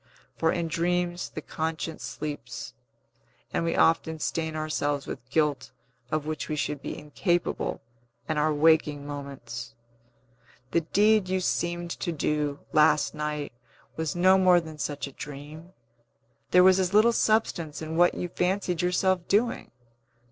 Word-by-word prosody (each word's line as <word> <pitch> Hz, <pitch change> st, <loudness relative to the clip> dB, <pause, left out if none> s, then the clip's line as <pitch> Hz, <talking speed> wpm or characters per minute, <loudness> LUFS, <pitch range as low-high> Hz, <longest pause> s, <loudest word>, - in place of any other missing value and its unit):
For 160 Hz, -, +2 dB
in 170 Hz, -2 st, -1 dB
dreams 175 Hz, +1 st, -1 dB
the 155 Hz, -, -7 dB
conscience 160 Hz, 0 st, -4 dB
sleeps, 145 Hz, -5 st, -6 dB, 0.8 s
and -, -, 0 dB
we 165 Hz, -, 0 dB
often 160 Hz, 0 st, +3 dB
stain 160 Hz, +1 st, -2 dB
ourselves 145 Hz, -2 st, -1 dB
with 125 Hz, -, -8 dB
guilt 150 Hz, -1 st, 0 dB, 0.4 s
of 155 Hz, +1 st, -1 dB
which 155 Hz, -1 st, -4 dB
we 155 Hz, -, -1 dB
should 145 Hz, -1 st, -2 dB
be -, -, -5 dB
incapable 175 Hz, +4 st, -1 dB, 0.4 s
in 155 Hz, -1 st, 0 dB
our 155 Hz, +1 st, +2 dB
waking 150 Hz, -1 st, +3 dB
moments. 130 Hz, -5 st, -7 dB, 1.0 s
The 170 Hz, -, +3 dB
deed 205 Hz, +3 st, +3 dB
you 190 Hz, 0 st, +1 dB
seemed 175 Hz, -1 st, -1 dB
to 175 Hz, -, -2 dB
do, 150 Hz, -2 st, -1 dB
last 150 Hz, -1 st, +4 dB
night, 150 Hz, -1 st, -3 dB, 0.4 s
was 160 Hz, 0 st, -2 dB
no 185 Hz, +2 st, +5 dB
more 180 Hz, -1 st, +6 dB
than 160 Hz, -2 st, -9 dB
such 145 Hz, -1 st, -3 dB
a 140 Hz, -, -9 dB
dream; 150 Hz, +5 st, -9 dB, 0.8 s
there 180 Hz, 0 st, +6 dB
was 190 Hz, 0 st, +6 dB
as 185 Hz, +1 st, 0 dB
little 225 Hz, +3 st, +6 dB
substance 175 Hz, -10 st, +1 dB
in 160 Hz, 0 st, -5 dB
what 175 Hz, +1 st, +4 dB
you 180 Hz, -, -3 dB
fancied 180 Hz, 0 st, -1 dB
yourself 180 Hz, 0 st, +1 dB
doing. 230 Hz, +4 st, +1 dB
160 Hz, 145 wpm, -27 LUFS, 150-180 Hz, 1.0 s, more